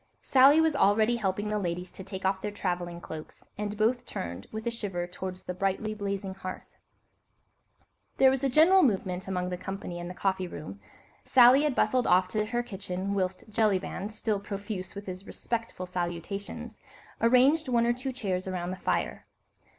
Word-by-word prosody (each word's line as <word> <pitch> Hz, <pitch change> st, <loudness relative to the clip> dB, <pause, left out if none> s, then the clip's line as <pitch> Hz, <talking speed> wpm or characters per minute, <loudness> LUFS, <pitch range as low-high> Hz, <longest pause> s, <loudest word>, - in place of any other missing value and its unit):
Sally 275 Hz, +3 st, +6 dB
was 320 Hz, -2 st, +3 dB
already 220 Hz, 0 st, +4 dB
helping 205 Hz, -1 st, -1 dB
the 210 Hz, 0 st, 0 dB
ladies 180 Hz, -1 st, -3 dB
to 190 Hz, -, -9 dB
take 190 Hz, 0 st, -6 dB
off 190 Hz, 0 st, +1 dB
their 210 Hz, -, -2 dB
travelling 175 Hz, -4 st, -3 dB
cloaks, 155 Hz, -2 st, -10 dB
and 210 Hz, 0 st, -4 dB
both 230 Hz, +3 st, +2 dB
turned, 85 Hz, +3 st, -6 dB
with 220 Hz, +1 st, -5 dB
a 235 Hz, -, 0 dB
shiver, 195 Hz, -6 st, -3 dB
towards 185 Hz, +1 st, -7 dB
the 180 Hz, -, -4 dB
brightly 195 Hz, +3 st, -1 dB
blazing 200 Hz, -2 st, -3 dB
hearth. 185 Hz, -1 st, -8 dB, 1.4 s
There 265 Hz, -1 st, +6 dB
was 265 Hz, 0 st, -1 dB
a 275 Hz, -, +3 dB
general 330 Hz, +8 st, +6 dB
movement 190 Hz, -, 0 dB
among 180 Hz, -1 st, -1 dB
the 180 Hz, -, -3 dB
company 185 Hz, -1 st, -6 dB
in 175 Hz, -, -5 dB
the 180 Hz, -, -7 dB
coffee 190 Hz, -1 st, 0 dB
room. 120 Hz, -, -8 dB, 0.4 s
Sally 255 Hz, +2 st, +7 dB
had 290 Hz, -4 st, 0 dB
bustled 255 Hz, -1 st, +2 dB
off 185 Hz, +1 st, +5 dB
to 215 Hz, +2 st, -1 dB
her 240 Hz, +2 st, -1 dB
kitchen, 195 Hz, -3 st, -4 dB
whilst 185 Hz, 0 st, -2 dB
Jellyband, 205 Hz, -2 st, 0 dB
still 215 Hz, -1 st, -1 dB
profuse 200 Hz, -1 st, -6 dB
with 200 Hz, +1 st, -7 dB
his 185 Hz, +1 st, -7 dB
respectful 230 Hz, -5 st, -4 dB
salutations, 180 Hz, +2 st, -5 dB, 0.4 s
arranged 265 Hz, +6 st, +5 dB
one 235 Hz, -2 st, +3 dB
or 240 Hz, -, +3 dB
two 255 Hz, +2 st, -4 dB
chairs 190 Hz, -7 st, -3 dB
around 180 Hz, -1 st, -3 dB
the 185 Hz, -, -5 dB
fire. -, -, -2 dB
200 Hz, 175 wpm, -29 LUFS, 185-230 Hz, 1.4 s, Sally